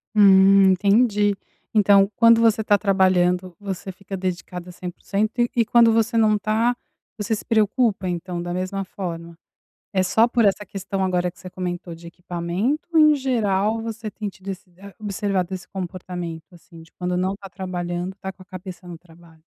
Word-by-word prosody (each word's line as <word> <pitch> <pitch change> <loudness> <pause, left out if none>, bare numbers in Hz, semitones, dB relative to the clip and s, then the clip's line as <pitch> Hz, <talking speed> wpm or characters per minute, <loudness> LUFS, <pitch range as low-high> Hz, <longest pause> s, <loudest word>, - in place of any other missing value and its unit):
Hum, 195 -1 +7
entendi, 205 +1 +2 0.3
então 200 -1 +4
quando 230 0 +6
você 225 -1 +3
está 205 -2 +3
trabalhando, 185 -2 +2
você 195 -1 -5
fica 195 +1 -8
dedicada 180 -1 -5
100%, 195 +5 -3
e 240 - +3
e 235 - +5
quando 235 -1 +5
você 225 +1 +1
não 215 -1 +4
tá, 220 +4 +1 0.4
você 215 +1 -2
se 210 - -8
preocupa 215 -3 +1
então 175 0 -4
da 175 0 -5
mesma 185 +2 -3
forma, 170 -3 -7 0.5
é 190 - +1
só 220 +6 +3
por 235 -1 +2
essa 205 0 +1
questão 195 0 -4
agora 180 -1 0
que 180 - -25
você 185 - -9
comentou 175 -1 -5
de 170 +1 -11
equipamento, 175 - -3
ou 320 - +5
em 305 -1 +6
geral 220 -5 0
você 225 -1 -5
tem 210 0 -5
tido 190 0 -12
esse 190 -1 -7 0.3
observado 200 -3 -2
esse 185 - -8
comportamento, 180 -2 -7
assim, 165 -1 -15
de 165 - -19
quando 180 0 -3
não 185 +2 0
tá 195 -1 -11
trabalhando, 180 0 -4
tá 190 - -5
com 190 - -14
a - - -16
cabeça 185 -1 -10
no 170 -2 -9
trabalho? 165 -1 -20
190 Hz, 175 wpm, -22 LUFS, 180-210 Hz, 0.5 s, Hum